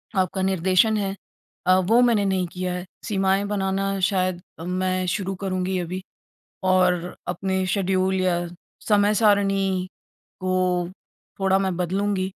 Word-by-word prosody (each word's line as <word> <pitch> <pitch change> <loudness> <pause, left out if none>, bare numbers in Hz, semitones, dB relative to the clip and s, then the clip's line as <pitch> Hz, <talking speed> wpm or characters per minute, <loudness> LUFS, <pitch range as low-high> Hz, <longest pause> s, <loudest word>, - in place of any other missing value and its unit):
आपका 190 0 0
निर्देशन 190 +3 +3
है 195 -1 -2 0.5
अ, 185 0 +5
वो 220 +6 +3
मैंने 235 -4 +3
नहीं 190 -2 0
किया 180 0 -2
है 180 0 -5 0.2
सीमाएँ 195 -1 +1
बनाना 195 -1 -1
शायद 185 -3 0 0.3
मैं 185 0 0
शुरू 195 +1 -2
करूँगी 185 -1 -1
अभी। 180 +2 -4 0.6
और 180 -1 +2
अपने 190 +1 -1
शेड्यूल 190 0 +1
या 185 -1 +2 0.5
समय-सारिणी 200 -3 +3 0.5
को 185 -1 0 0.5
थोड़ा 190 0 +3
मैं 190 -2 -1
बदलूँगी। 190 +2 0
190 Hz, 120 wpm, -24 LUFS, 185-195 Hz, 0.6 s, अ